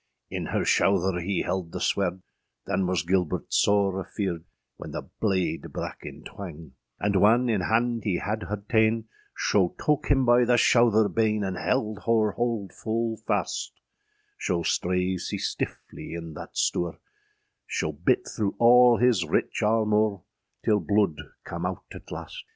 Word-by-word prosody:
In - - -3
her - - -1
shouther 95 -2 +2
hee 95 +2 -1
held 90 -2 -3
the - - -5
swerde; 95 -1 0 0.4
Than 95 -2 0
was 90 -1 0
Gilbert 90 -1 -1
sore 100 -2 +3
afearde, 90 -3 -4 0.3
When - - -8
the - - -4 0.2
blade 95 -6 -1
brak - - -5
in - - -9
twang. 85 -6 -9 0.3
And 100 -1 +1
whan 115 +6 +4
in 105 -5 +1
hande 115 +3 +1
hee 95 -5 0
had 110 +4 -3
her 105 - -1
taâen, 110 +2 +2 0.3
Scho 95 -4 +1
toke 150 -1 +1
hym 135 -2 +3
by 120 0 +5
the 120 0 +3
shouther 115 -2 +4
bane, 110 -1 +1
And 95 -1 -2
held 110 -1 -1
her 110 -2 +3
hold 115 -3 -2
ful 115 0 -2
faste; - - -2 0.6
Scho 85 -2 -1
strave 90 +2 0
sea - - -3
stifflie 85 - -5
in 85 -1 -7
thatte - - -9
stoure, 85 -1 0 0.7
Scho 80 - -1
byt 75 +4 +1
throâ 100 -2 -2
ale 120 0 +7
hys 120 -6 +3
rich 80 - -1
armoure, 105 -3 +2 0.4
Till 105 -1 +3
bloud 100 -1 +1 0.3
cam - - -3
owt - - -5
at - - -12
laste. - - -7
100 Hz, 155 wpm, -26 LUFS, 90-115 Hz, 0.7 s, ale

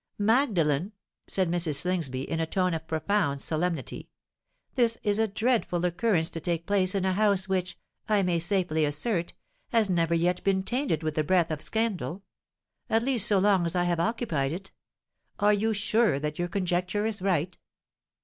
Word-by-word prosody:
"Magdalen," 205 - +2 0.3
said 190 -2 +1
Mrs. 170 -4 +1
Slingsby, 150 -5 -1
in 165 - -2
a 165 - 0
tone 185 +1 0
of 160 0 -5
profound 160 -2 0
solemnity, 160 -1 -3 0.6
"this 235 -3 +2
is 205 0 +2
a 225 - +3
dreadful 215 -5 0
occurrence 175 -2 +1
to 165 - -5
take 170 0 -2
place 195 -2 +1
in 190 -1 0
a 190 - +1
house 200 -1 +2
which, 185 -2 -2 0.3
I 210 -2 +3
may 175 -2 +1
safely 175 -3 0
assert, 170 +5 -1 0.3
has 225 -6 +2
never 170 -1 +2
yet 175 +2 0
been 190 -1 +1
tainted 240 - -1
with 155 -1 -1
the 155 - 0
breath 170 +1 +2
of 155 -1 -3
scandal—at 220 +1 -4
least 245 -5 +1
so 205 - +4
long 195 -1 +3
as 170 +1 -2
I 175 - +2
have 175 -1 0
occupied 170 - -1
it. 195 +3 -7 0.7
Are 210 +1 +4
you 215 +2 +1
sure 215 -6 +2
that 150 +2 -4
your 175 - 0
conjecture 180 +2 -1
is 220 -3 -3
right?" 180 -2 0
185 Hz, 170 wpm, -27 LUFS, 165-205 Hz, 0.7 s, so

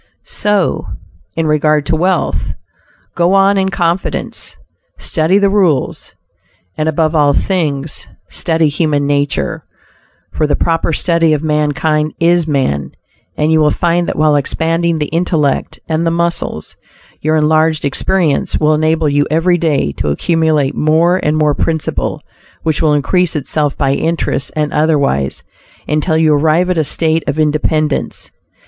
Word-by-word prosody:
So 205 -3 -1 0.5
in 165 - -1
regard 150 -1 +2
to 160 - 0
wealth. 175 - -1 0.6
Go 175 +2 +1
on 195 +1 +4
in 190 0 0
confidence, 175 -1 -2 0.4
study 165 +4 +1
the 200 -1 +2
rules, 180 -9 0 0.6
and 155 +1 -1
above 155 0 0
all 145 -2 +3
things, 150 -5 -1 0.2
study 165 -2 0
human 145 -1 0
nature; 145 - -1 0.7
for 155 - 0
"the 145 - +1
proper 165 0 0
study 165 0 +2
of 150 0 -1
mankind 150 0 0
is 170 0 +2
man," 130 - -1 0.4
and 150 +1 +1
you 160 - +4
will 150 -1 +4
find 170 +2 0
that - - -2
while 155 -1 +3
expanding 165 +3 0
the 150 - -1
intellect 160 -5 0
and 160 0 -1
the 165 - +1
muscles, 170 - -2 0.4
your 155 +1 +1
enlarged 155 0 +2
experience 160 +2 0
will 155 0 +3
enable 155 +1 +1
you 145 0 +1
every 170 +3 +2
day 150 - 0
to 75 - -1
accumulate 155 - +1
more 165 +4 +2
and 150 -4 0
more 150 -1 +2
principal, 160 +1 -2 0.4
which 160 -3 0
will 155 -2 +3
increase 175 +4 0
itself 150 0 -1
by 135 -2 +1
interest 160 -3 -2
and 150 -1 -1
otherwise, 145 - 0 0.4
until 155 +2 0
you 160 -1 +3
arrive 160 +5 +2
at 180 - -1
a - - +2
state 160 +2 0
of 145 - -2
independence. 155 0 -1
155 Hz, 145 wpm, -14 LUFS, 150-170 Hz, 0.7 s, on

